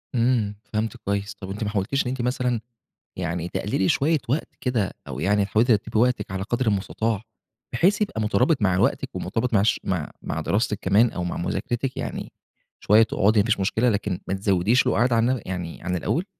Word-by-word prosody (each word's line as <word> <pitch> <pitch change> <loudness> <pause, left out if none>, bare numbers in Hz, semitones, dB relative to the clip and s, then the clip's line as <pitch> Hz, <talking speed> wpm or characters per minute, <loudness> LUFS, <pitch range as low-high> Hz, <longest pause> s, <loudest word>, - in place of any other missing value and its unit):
إمم، 115 -4 +2 0.2
فهَمتِك 110 +3 -2
كويس، 100 0 -1
طب 95 - -7
أنتِ 105 +3 -4
ما 105 - -1
حاولتيش 105 +6 0
إن - - -1
أنتِ 130 -1 -3
مثلًا 125 -1 0 0.6
يعني 85 -1 -3
تقلِّلي 95 0 0
شوية 155 +4 +3
وقت 145 +6 0
كده، 115 -7 0 0.2
أو 65 -1 -5
يعني 100 +5 +2
حاولتِ 110 +4 +2
ترتبي 110 -2 +1
وقتِك 120 -5 +1
على 95 0 -2
قدر 120 +3 -1
المُستطاع، 105 +1 0 0.5
بحيث 190 - +3
يبقى 200 - -1
مُترابط 120 +7 +2
مع 95 -3 +3
وقتِك، 95 - +1
ومُرتبط 120 +1 -2
مع 100 -2 +4
ش 110 - +2
مع 90 -6 -2
مع - - -3
دراستِك 105 0 0
كمان، 105 +5 +4
أو 90 - -4
مع 90 - -3
مذاكرتِك، 125 +7 -2
يعني - - -5 0.5
شوية 105 +2 +5
تقعدي 110 0 +2
ما 100 - +3
فيش 110 -3 +1
مشكلة، 110 +5 +2
لكن 100 -4 -1
ما - - -1
تزوديش 100 +4 +2
القُعاد 120 +1 +2
عن 120 +2 +2
يعني 90 -3 -5
عن 90 +1 -1
الأول. 160 - -1
105 Hz, 190 wpm, -24 LUFS, 95-120 Hz, 0.6 s, شوية